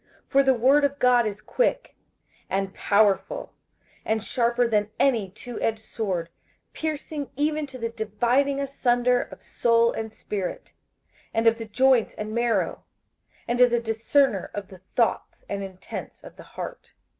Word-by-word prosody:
58:004:012 -, -, -38 dB
For 275 Hz, -, +6 dB
the 265 Hz, -1 st, +4 dB
word 270 Hz, +5 st, +4 dB
of 285 Hz, 0 st, +1 dB
God 245 Hz, -3 st, +4 dB
is 210 Hz, 0 st, -5 dB
quick, -, -, 0 dB, 0.5 s
and 195 Hz, 0 st, -1 dB
powerful, 205 Hz, -, +1 dB, 0.5 s
and 220 Hz, -1 st, -1 dB
sharper 240 Hz, +1 st, +1 dB
than 210 Hz, -2 st, +1 dB
any 230 Hz, -8 st, +2 dB
twoedged 225 Hz, +2 st, -3 dB
sword, 195 Hz, -6 st, -3 dB, 0.4 s
piercing 305 Hz, -2 st, -4 dB
even 300 Hz, +1 st, 0 dB
to 265 Hz, -2 st, -9 dB
the 230 Hz, -2 st, -2 dB
dividing 240 Hz, +6 st, +1 dB
asunder 250 Hz, -3 st, +2 dB
of -, -, -10 dB
soul 235 Hz, 0 st, +3 dB
and 220 Hz, -1 st, -5 dB
spirit, 200 Hz, -4 st, -5 dB, 0.6 s
and 225 Hz, +1 st, +1 dB
of 230 Hz, 0 st, +4 dB
the 225 Hz, -, -5 dB
joints 255 Hz, +2 st, +3 dB
and 215 Hz, 0 st, -5 dB
marrow, 235 Hz, 0 st, 0 dB, 0.6 s
and 240 Hz, +1 st, +1 dB
is 250 Hz, -1 st, +7 dB
a 240 Hz, -, +4 dB
discerner 225 Hz, -1 st, +1 dB
of 205 Hz, -2 st, -5 dB
the 185 Hz, -2 st, -13 dB
thoughts 235 Hz, -2 st, 0 dB
and 200 Hz, 0 st, -3 dB
intents 190 Hz, -1 st, -8 dB
of -, -, -12 dB
the -, -, -12 dB, 0.2 s
heart. -, -, -7 dB
235 Hz, 155 wpm, -25 LUFS, 215-265 Hz, 0.6 s, is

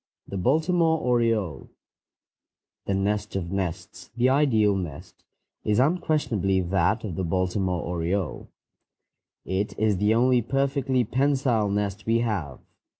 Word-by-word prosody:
THE -, -, -7 dB
BALTIMORE 160 Hz, -, +2 dB
ORIOLE 115 Hz, -, 0 dB, 1.2 s
The 100 Hz, -, 0 dB
nest 105 Hz, +2 st, -1 dB
of 90 Hz, -2 st, -3 dB
nests, 95 Hz, -4 st, -4 dB
the 125 Hz, +2 st, +3 dB
ideal 115 Hz, -8 st, +3 dB
nest, 85 Hz, -7 st, -7 dB, 0.4 s
is 105 Hz, -1 st, +1 dB
unquestionably 130 Hz, -, +1 dB
that 95 Hz, +5 st, +1 dB
of 105 Hz, -5 st, -4 dB
the 95 Hz, -, -2 dB
Baltimore 90 Hz, +1 st, -1 dB
oriole. 85 Hz, +1 st, -3 dB, 1.0 s
It 95 Hz, +2 st, -2 dB
is 105 Hz, -2 st, +1 dB
the 105 Hz, +3 st, +2 dB
only 125 Hz, +1 st, +3 dB
perfectly 135 Hz, +1 st, 0 dB
pensile 130 Hz, -3 st, +1 dB
nest 100 Hz, +1 st, -2 dB
we 115 Hz, +1 st, +2 dB
have. 95 Hz, -, -3 dB
105 Hz, 120 wpm, -25 LUFS, 95-130 Hz, 1.2 s, the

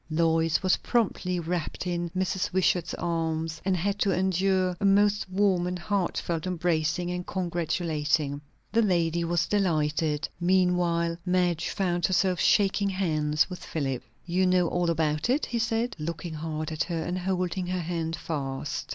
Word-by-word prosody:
Lois 165 Hz, +1 st, +2 dB
was 185 Hz, -, +3 dB
promptly 190 Hz, -6 st, 0 dB
wrapped 170 Hz, 0 st, -3 dB
in 175 Hz, -1 st, -2 dB
Mrs. 185 Hz, 0 st, -1 dB
Wishart's 180 Hz, -2 st, +1 dB
arms, 160 Hz, -1 st, -2 dB
and 190 Hz, -1 st, +1 dB
had 200 Hz, +4 st, -1 dB
to 205 Hz, -, +2 dB
endure 185 Hz, 0 st, +1 dB
a -, -, -5 dB
most 205 Hz, 0 st, +3 dB
warm 185 Hz, -2 st, +2 dB
and 180 Hz, 0 st, -2 dB
heartfelt 175 Hz, -3 st, -1 dB
embracing 175 Hz, -1 st, 0 dB
and 180 Hz, 0 st, -4 dB
congratulating. 160 Hz, -5 st, -1 dB, 0.3 s
The 230 Hz, +2 st, +3 dB
lady 170 Hz, -4 st, +1 dB
was 170 Hz, 0 st, +1 dB
delighted. 155 Hz, -5 st, 0 dB
Meanwhile 175 Hz, -2 st, +2 dB
Madge 180 Hz, -2 st, +1 dB
found 175 Hz, -3 st, 0 dB
herself 185 Hz, -1 st, +1 dB
shaking 200 Hz, -2 st, +3 dB
hands 155 Hz, -5 st, +1 dB
with 180 Hz, -2 st, -8 dB
Philip. 135 Hz, -5 st, -2 dB, 0.2 s
"You 180 Hz, +2 st, +1 dB
know 180 Hz, -1 st, +3 dB
all 175 Hz, -1 st, 0 dB
about 155 Hz, +2 st, 0 dB
it?" 275 Hz, +5 st, +2 dB
he 235 Hz, -, -2 dB
said, 230 Hz, +1 st, 0 dB
looking 165 Hz, +2 st, -4 dB
hard 155 Hz, 0 st, -4 dB
at 155 Hz, -, -1 dB
her, 165 Hz, -3 st, -2 dB
and 180 Hz, +2 st, -2 dB
holding 185 Hz, 0 st, -1 dB
her 180 Hz, 0 st, -1 dB
hand 165 Hz, -1 st, -2 dB
fast. 135 Hz, -6 st, -4 dB
175 Hz, 150 wpm, -27 LUFS, 160-185 Hz, 0.3 s, was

